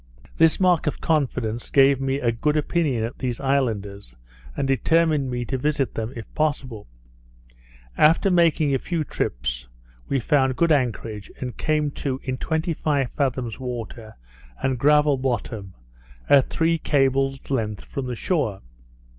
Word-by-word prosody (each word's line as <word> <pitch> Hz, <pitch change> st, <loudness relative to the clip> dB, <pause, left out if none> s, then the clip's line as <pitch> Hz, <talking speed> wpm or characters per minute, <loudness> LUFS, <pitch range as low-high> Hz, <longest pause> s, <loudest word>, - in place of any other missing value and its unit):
This 165 Hz, -1 st, +4 dB
mark 180 Hz, -4 st, +3 dB
of 150 Hz, -, -1 dB
confidence 120 Hz, -7 st, -1 dB
gave 135 Hz, -1 st, +4 dB
me 135 Hz, 0 st, 0 dB
a 120 Hz, -4 st, +1 dB
good 150 Hz, +7 st, 0 dB
opinion 150 Hz, -6 st, 0 dB
of 115 Hz, -, -5 dB
these 125 Hz, -2 st, -3 dB
islanders, 105 Hz, -, -1 dB, 0.4 s
and 135 Hz, -, 0 dB
determined 150 Hz, +1 st, +2 dB
me 120 Hz, -1 st, -3 dB
to 130 Hz, +2 st, -3 dB
visit 145 Hz, -1 st, 0 dB
them, 110 Hz, +1 st, -4 dB
if 115 Hz, -2 st, -7 dB
possible. 140 Hz, -8 st, -2 dB, 1.1 s
After 165 Hz, +5 st, +5 dB
making 165 Hz, -4 st, +3 dB
a 135 Hz, -, +1 dB
few 170 Hz, +1 st, -2 dB
trips, -, -, -3 dB, 0.4 s
we 135 Hz, -, +1 dB
found 130 Hz, 0 st, +2 dB
good 170 Hz, +4 st, +2 dB
anchorage, 115 Hz, -6 st, -1 dB
and 125 Hz, -1 st, -5 dB
came 150 Hz, -2 st, 0 dB
to 135 Hz, -2 st, -2 dB
in 130 Hz, -1 st, -3 dB
twenty 160 Hz, +1 st, -1 dB
five 145 Hz, -5 st, -1 dB
fathoms 130 Hz, -5 st, -2 dB
water, 120 Hz, -3 st, -6 dB, 0.5 s
and 130 Hz, -2 st, 0 dB
gravel 150 Hz, 0 st, +4 dB
bottom, 115 Hz, -6 st, -3 dB, 0.5 s
at 140 Hz, -2 st, +5 dB
three 165 Hz, 0 st, +1 dB
cables' 135 Hz, -2 st, 0 dB
length 110 Hz, -6 st, -2 dB
from 135 Hz, -2 st, -5 dB
the 125 Hz, -, -3 dB
shore. 115 Hz, -, -1 dB
135 Hz, 145 wpm, -23 LUFS, 120-150 Hz, 1.1 s, After